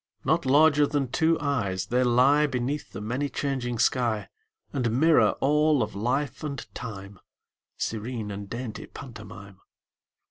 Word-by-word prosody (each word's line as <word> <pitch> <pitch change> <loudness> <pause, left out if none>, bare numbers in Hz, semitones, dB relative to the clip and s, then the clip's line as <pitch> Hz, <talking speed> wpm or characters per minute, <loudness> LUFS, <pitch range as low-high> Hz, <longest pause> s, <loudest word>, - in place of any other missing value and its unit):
Not - - +1
larger 145 +1 +5
than 140 -4 -1
two 165 +1 +2
eyes, 110 -11 -1
they 125 +5 +1
lie 130 +5 +4
Beneath 135 +2 -3
the - - -7
many 125 +7 -2
changing 130 -5 -2
sky 115 -3 +1 0.4
And 125 -3 0
mirror 160 +1 +5
all 150 -1 +3
of 110 - -5
life 130 +9 -2
and 140 -2 -4
time, 100 -4 -8 0.6
Serene 110 -1 -4
and 100 0 -7
dainty 115 -2 -6
pantomime. 105 -5 -11
125 Hz, 135 wpm, -26 LUFS, 110-145 Hz, 0.6 s, larger